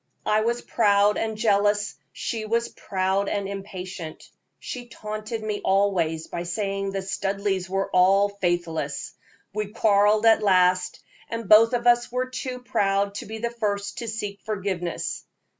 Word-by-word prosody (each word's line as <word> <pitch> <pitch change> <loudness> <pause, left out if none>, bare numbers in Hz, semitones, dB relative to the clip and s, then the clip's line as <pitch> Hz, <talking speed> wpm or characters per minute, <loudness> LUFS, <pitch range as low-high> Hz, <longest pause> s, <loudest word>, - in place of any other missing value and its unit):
I 215 0 +3
was 235 +2 -1
proud 205 -2 +3
and 220 -1 -2
jealous, 205 -1 +2 0.2
she 225 -2 -4
was 230 +2 0
proud 190 +1 -1
and 200 -1 -2
impatient; 190 -4 -7 0.3
she 245 -1 -7
taunted 215 0 -6
me 210 -1 -3
always 180 -5 +1
by 170 - -5
saying 195 +2 -2
the 195 0 -3
Studleighs 195 -1 -2
were 195 +1 -1
all 195 +2 +5
faithless. 175 -7 -2 0.4
We 210 0 -2
quarreled 210 0 +3
at 225 -1 +6
last, 185 -2 +2 0.3
and 230 -2 -4
both 225 +4 +7
of 240 0 0
us 240 0 +4
were 250 +1 0
too 255 -1 -5
proud 200 -3 +1
to - - -10
be 220 +1 -6
the 235 +1 -2
first 205 -3 -2
to 235 - -5
seek 210 -2 -4
forgiveness. 190 -5 -3
200 Hz, 150 wpm, -25 LUFS, 195-220 Hz, 0.4 s, both